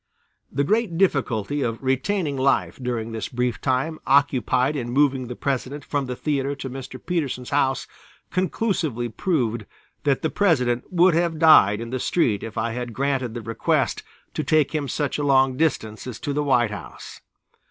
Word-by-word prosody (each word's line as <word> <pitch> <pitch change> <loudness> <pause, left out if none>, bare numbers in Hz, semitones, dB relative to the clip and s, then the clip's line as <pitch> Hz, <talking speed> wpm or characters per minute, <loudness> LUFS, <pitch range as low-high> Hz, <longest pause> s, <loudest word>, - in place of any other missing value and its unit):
The 140 - 0
great 210 +1 +1
difficulty 140 - +1
of 115 -3 -1
retaining 140 +5 0
life 135 0 +1
during 120 -2 -3
this 110 -1 -4
brief 125 -1 -2
time 140 +4 0
occupied 135 0 +3
in 120 -4 -3
moving 135 -1 +2
the 125 - -6
President 140 +2 -3
from 145 -2 -2
the 125 - -3
theatre 140 0 -1
to 135 -2 -6
Mr. 130 0 -8
Petersen's 140 -8 -3
house, 135 -2 +1 0.5
conclusively 180 - -1
proved 120 - -1 0.4
that 140 -2 +1
the 160 - 0
President 125 -11 +2
would 180 0 +5
have 170 0 +1
died 130 -11 +6
in 115 0 -6
the 130 - -2
street 115 - +1
if 110 -1 -7
I 115 - 0
had 120 0 -5
granted 130 -2 -1
the 120 - -4
request 115 +1 0 0.3
to - - -2
take 155 -1 +2
him 150 -3 -1
such 145 +1 -2
a - - -1
long 135 -2 +4
distance 125 -8 -1
as 120 -3 -6
to 145 - -2
the 150 +1 0
White 120 -6 +2
House. 105 - -9
135 Hz, 175 wpm, -23 LUFS, 120-150 Hz, 0.5 s, died